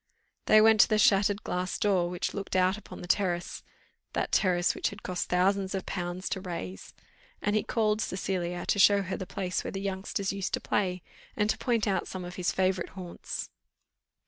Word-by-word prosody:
They 215 0 +7
went 220 0 +6
to - - +6
the 215 - +2
shattered 205 0 +3
glass 180 +1 -2
door, 185 -4 +2
which 175 0 -3
looked 200 -2 -4
out 185 +1 +3
upon 215 - -10
the 175 - -8
terrace 175 -2 0 0.5
that - - -1
terrace 180 -2 +3
which - - -1
had 200 +1 -11
cost 180 -1 -3
thousands 190 +2 +2
of 190 - -3
pounds 175 0 -4
to 190 - -3
raise, 130 - -6 0.4
and 205 +1 0
he 215 - +3
called 215 -2 0
Cecilia 180 -3 -2
to 200 - +1
show 200 0 +6
her 190 0 -3
the 185 - -6
place 185 -2 -2
where - - -4
the 195 - -4
youngsters 195 0 -2
used 195 -3 -1
to - - -5
play, 180 -3 -1 0.3
and 210 +1 +2
to - - -3
point 235 -4 +1
out 195 - 0
some 185 -1 -6
of 175 - -7
his 180 -1 0
favourite 185 -1 0
haunts. 180 -2 -6
190 Hz, 200 wpm, -29 LUFS, 180-200 Hz, 0.5 s, They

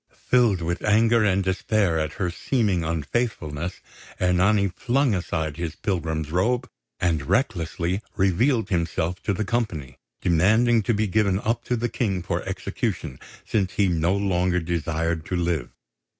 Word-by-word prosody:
Filled 115 -9 +2
with 85 +2 -2
anger 110 +2 +4
and 100 -1 +2
despair 95 -2 +1
at 80 0 -2
her 90 -3 -2
seeming 100 -3 0
unfaithfulness, 80 - -2 0.4
Ernani 95 +3 +3
flung 130 +4 +1
aside 80 -4 -2
his 85 -2 -4
pilgrim's 80 -5 -2
robe 120 +9 +1 0.3
and 80 -6 0
recklessly 90 - 0
revealed 110 +6 +2
himself 85 0 -1
to - - -1
the 100 +2 -1
company, 90 - -2 0.2
demanding 110 +8 +3
to 110 +2 0
be 110 +1 +1
given 100 -1 +2
up 110 +3 -1
to 125 - 0
the 120 +1 -1
King 100 -7 -1
for - - -2
execution, 65 - -3 0.3
since 95 -4 0
he 100 -2 +2
no 85 +2 +1
longer 90 -2 +1
desired 80 -1 -1
to 90 - -2
live. 85 -7 -1
95 Hz, 145 wpm, -24 LUFS, 85-110 Hz, 0.4 s, anger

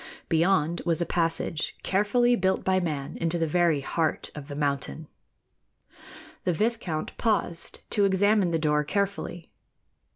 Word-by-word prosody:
Beyond 165 0 +2
was 170 -2 +1
a 170 - +1
passage 165 -2 -1
carefully 240 +6 +3
built 190 -3 +1
by 190 0 +2
man 150 -6 -3
into 165 +1 +1
the 165 - +1
very 165 -2 +2
heart 160 +3 -1
of 145 -2 -8
the 145 - -6
mountain. 145 +1 -2 1.4
The 180 - +1
viscount 210 -5 -2
paused 195 -6 -1
to 205 - +3
examine 200 0 +3
the 165 - +1
door 150 -1 +1
carefully. 195 0 -3
170 Hz, 135 wpm, -27 LUFS, 155-195 Hz, 1.4 s, carefully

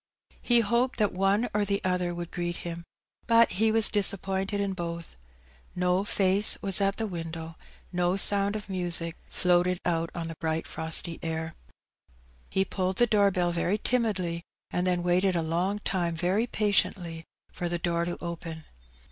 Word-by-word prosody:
He 240 -1 +3
hoped 235 +4 +1
that 210 -3 +2
one 195 +5 +1
or 210 0 +1
the 200 0 0
other 180 -1 0
would 170 0 -6
greet 175 0 -3
him; 170 0 -6 0.4
but 230 -1 +5
he 220 +4 +2
was 225 0 +7
disappointed 195 -1 +1
in 200 -1 -1
both. 170 -2 -6 0.6
No 180 +1 +1
face 200 0 +1
was 195 0 +4
at 195 0 +1
the 225 - -2
window^ 165 -2 -6 0.4
no 180 +1 +1
sound 200 +1 +4
of 210 - -6
music 175 -3 -2
floated 180 0 +2
out 165 -1 0
on 170 -1 -4
the 165 - -6
bright 160 0 -1
frosty 160 +1 +1
air. 160 0 -4 1.0
He 190 0 +1
pulled 185 -1 -2
the 240 - +4
door 205 -3 +3
bell 180 -2 0
very 175 +4 0
timidly^ 195 -9 0 0.3
and 180 +1 -1
then 180 -1 0
waited 180 +1 +2
a 170 - 0
long 175 +5 -1
time 175 -5 -2
very 190 +7 0
patiently 185 -6 0 0.3
for 175 - -4
the 175 - -1
door 170 0 -1
to 175 - -4
open. 165 -2 -6
180 Hz, 165 wpm, -27 LUFS, 170-200 Hz, 1.0 s, was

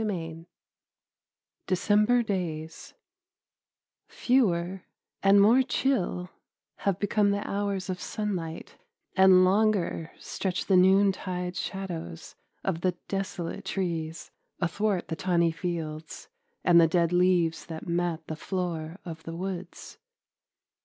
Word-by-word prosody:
XLIV 165 -6 -4 1.2
DECEMBER 210 +6 +3
DAYS 165 -6 -4 1.1
Fewer 190 -7 +1 0.4
and 195 +1 +6
more 225 +6 +6
chill 200 -9 -1 0.5
have 195 -3 0
become 205 0 +2
the 200 +1 -1
hours 200 -1 -2
of 185 -1 -4
sunlight, 180 -7 -4 0.4
and 190 -1 +7
longer 195 -4 +1
stretch 190 -1 -3
the 195 - +3
noontide 185 -1 +3
shadows 175 - -5 0.3
of 175 -4 -1
the 185 0 +1
desolate 195 -3 -4
trees 165 -4 -3 0.3
athwart 190 +2 0
the 160 - -3
tawny 170 -1 +2
fields 160 -2 -5 0.3
and 170 -1 +6
the 165 - +6
dead 170 +1 +1
leaves 175 -2 +2
that 160 -2 -7
mat 170 -2 -1
the 155 - -5
floor 170 -1 -4
of 165 -2 -7
the 165 +1 -7
woods. 185 0 -6
180 Hz, 110 wpm, -28 LUFS, 165-195 Hz, 1.2 s, and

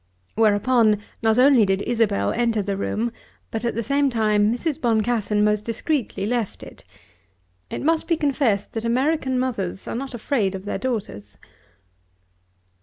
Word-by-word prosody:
Whereupon 220 +1 +3 0.2
not 220 0 +2
only 255 -2 +6
did 195 0 +1
Isabel 220 - +1
enter 230 -3 0
the 200 0 -2
room, 220 +4 -2 0.4
but 225 +1 -3
at 235 - -1
the 230 - -1
same 280 +4 +2
time 215 -3 +2
Mrs. 305 +5 -2
Boncassen 220 -2 +1
most 210 0 +2
discreetly 230 -3 -2
left 235 -2 -2
it. - - -13 0.9
It - - -5
must 325 +2 +1
be 335 - +1
confessed 270 -9 0
that 225 - -3
American 260 +2 0
mothers 205 -8 -3
are - - -3
not 260 +1 -5
afraid 215 -5 -1
of 190 +1 -8
their 205 - -3
daughters. 145 - -4
230 Hz, 150 wpm, -23 LUFS, 210-255 Hz, 0.9 s, only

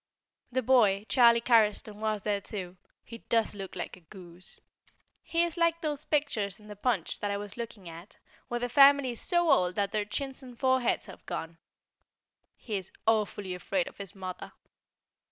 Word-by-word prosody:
The 260 +1 0
boy, 215 -5 +4
Charlie 235 -3 +6
Carriston, 215 -3 +2
was 215 -1 -2
there 205 -1 0
too; 185 -3 -6 0.3
he 230 - -10
does 225 -2 +2
look 195 -2 -8
a 180 - -5
goose. 175 0 -12 0.6
He 335 0 +1
is 345 0 -3
like 335 0 +2
those 300 -2 -2
pictures 220 - -1
in 210 - -16
the 210 - -9
Punch 205 -4 -1
that 205 - -2
I 200 - -1
was 205 -1 -7
looking 225 -5 -7
at, 170 +4 -11 0.3
where 240 - -2
the 245 - -1
family 275 0 +6
is 235 - -7
so 345 -3 +2
old 180 -8 +3
that 200 -1 0
their 210 -1 -1
chins 270 +6 -5
and 250 -2 -12
foreheads 260 -1 +1
have - - -12
gone. 165 0 -5 1.0
He 215 -4 -4
is 190 -1 -4
awfully 210 -3 0
afraid 180 0 -1
of - - -12
his 200 -1 -5
mother. 185 -1 -7
215 Hz, 175 wpm, -29 LUFS, 195-255 Hz, 1.0 s, Charlie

